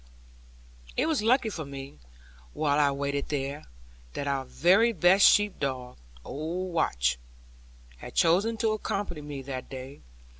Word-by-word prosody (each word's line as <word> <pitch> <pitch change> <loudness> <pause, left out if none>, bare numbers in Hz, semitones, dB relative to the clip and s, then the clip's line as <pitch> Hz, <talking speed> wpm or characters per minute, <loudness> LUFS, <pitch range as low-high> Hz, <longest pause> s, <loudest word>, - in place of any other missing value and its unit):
It - - +2
was 315 -7 +1
lucky 235 +1 +3
for 165 - -5
me, 140 - -9 0.5
while 150 -1 +1
I 145 -1 +4
waited 140 0 -2
here, 140 +1 -3 0.5
that 140 - -4
our 135 -1 -1
very 195 - +3
best 185 +2 +6
sheep 205 -1 +3
dog, 130 -3 -3 0.3
old 170 +5 -4
Watch, - - +1 0.8
had - - -10
chosen 195 +7 +3
to 220 -1 +1
accompany 200 -6 -3
me 145 -2 -7
that 130 -1 -6
day. 135 +1 -9
150 Hz, 140 wpm, -28 LUFS, 135-195 Hz, 0.8 s, best